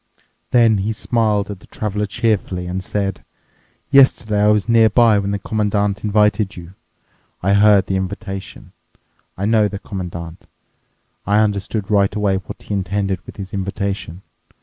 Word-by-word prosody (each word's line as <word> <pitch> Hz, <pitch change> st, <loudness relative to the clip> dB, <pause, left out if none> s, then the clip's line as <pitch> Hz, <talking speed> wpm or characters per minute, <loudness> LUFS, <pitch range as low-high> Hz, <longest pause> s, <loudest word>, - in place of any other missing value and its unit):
Then 115 Hz, -4 st, +4 dB
he 105 Hz, +3 st, -1 dB
smiled 105 Hz, -3 st, 0 dB
at 100 Hz, -, -8 dB
the -, -, -19 dB
Traveler 105 Hz, -1 st, -3 dB
cheerfully 100 Hz, -5 st, -1 dB
and 90 Hz, +1 st, -4 dB
said, 95 Hz, -1 st, -3 dB, 0.7 s
"Yesterday 120 Hz, -6 st, +4 dB
I 105 Hz, -, +4 dB
was 105 Hz, 0 st, +2 dB
nearby 115 Hz, -1 st, +5 dB
when 100 Hz, 0 st, -2 dB
the 100 Hz, -, -1 dB
Commandant 105 Hz, 0 st, -1 dB
invited 105 Hz, -1 st, +2 dB
you. 85 Hz, +1 st, -10 dB, 0.7 s
I 100 Hz, +2 st, +3 dB
heard 100 Hz, -1 st, +5 dB
the 95 Hz, -, -1 dB
invitation. 95 Hz, +1 st, -6 dB, 0.7 s
I 95 Hz, -, -2 dB
know 110 Hz, -1 st, +3 dB
the 100 Hz, 0 st, -6 dB
Commandant. 85 Hz, -4 st, -7 dB, 0.8 s
I 100 Hz, +1 st, +3 dB
understood 105 Hz, 0 st, -1 dB
right 100 Hz, -1 st, +2 dB
away 100 Hz, -2 st, +1 dB
what 95 Hz, -4 st, -9 dB
he -, -, -5 dB
intended 95 Hz, -1 st, -2 dB
with -, -, -11 dB
his 95 Hz, -2 st, -8 dB
invitation. 95 Hz, -2 st, -4 dB
100 Hz, 150 wpm, -19 LUFS, 95-105 Hz, 0.8 s, nearby